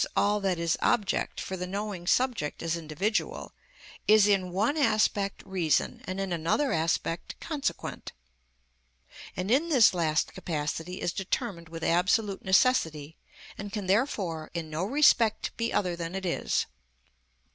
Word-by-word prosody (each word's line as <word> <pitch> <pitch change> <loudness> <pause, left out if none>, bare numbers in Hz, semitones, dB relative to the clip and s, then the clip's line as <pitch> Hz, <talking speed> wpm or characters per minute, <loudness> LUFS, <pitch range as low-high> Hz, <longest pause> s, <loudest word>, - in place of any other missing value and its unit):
_, - - +3
all 210 +1 +2
that 190 -3 0
is 170 -1 0
object 205 - 0
for 190 - -4
the 180 0 -4
knowing 195 -2 -4
subject 240 - 0
as 165 0 0
individual, 195 - -2 0.6
is 215 -1 +7
in 195 -3 +2
one 210 - +1
aspect 215 -7 +1
reason, 180 -6 0
and 185 +1 -4
in 195 -2 -2
another 170 - +1
aspect 165 +1 -1
consequent; 300 -4 -4 1.3
and 185 +4 -2
in 300 +7 +3
this 255 -11 +6
last 160 -4 0
capacity 160 +3 -4
is 175 - -1
determined 190 -3 -3
with 165 0 -7
absolute 195 +4 +1
necessity, 165 - +2 0.4
and 200 0 -6
can, 205 -1 -4
therefore, 185 - 0
in 160 -2 -4
no 155 +3 -2
respect 230 -2 +3
be 230 0 -1
other 180 -3 0
than 170 +1 -5
it 190 0 -4
is. 175 - 0
190 Hz, 145 wpm, -28 LUFS, 170-215 Hz, 1.3 s, is